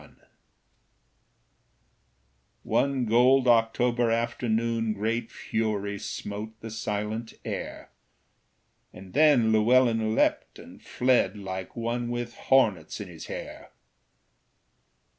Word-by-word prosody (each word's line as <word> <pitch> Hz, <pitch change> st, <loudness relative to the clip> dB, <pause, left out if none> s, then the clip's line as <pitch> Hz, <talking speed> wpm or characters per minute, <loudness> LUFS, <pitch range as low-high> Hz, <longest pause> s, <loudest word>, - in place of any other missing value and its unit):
One 135 Hz, -2 st, +1 dB
gold 125 Hz, +3 st, +4 dB
October 120 Hz, +1 st, +3 dB
afternoon 115 Hz, -1 st, 0 dB
Great 110 Hz, +3 st, -2 dB
fury 105 Hz, -2 st, -2 dB
smote 110 Hz, +3 st, -6 dB
the 115 Hz, -, -8 dB
silent 110 Hz, +1 st, -4 dB
air; -, -, -6 dB, 1.0 s
And 95 Hz, 0 st, -13 dB
then 140 Hz, -6 st, +5 dB
Llewellyn 115 Hz, 0 st, +3 dB
leapt -, -, 0 dB
and -, -, -13 dB
fled 125 Hz, -6 st, +1 dB
Like 95 Hz, -2 st, -6 dB
one 120 Hz, 0 st, -2 dB
with 120 Hz, 0 st, -4 dB
hornets 105 Hz, -14 st, +1 dB
in 100 Hz, -3 st, -7 dB
his 80 Hz, -2 st, -10 dB
hair. -, -, -8 dB
115 Hz, 90 wpm, -27 LUFS, 105-120 Hz, 1.0 s, then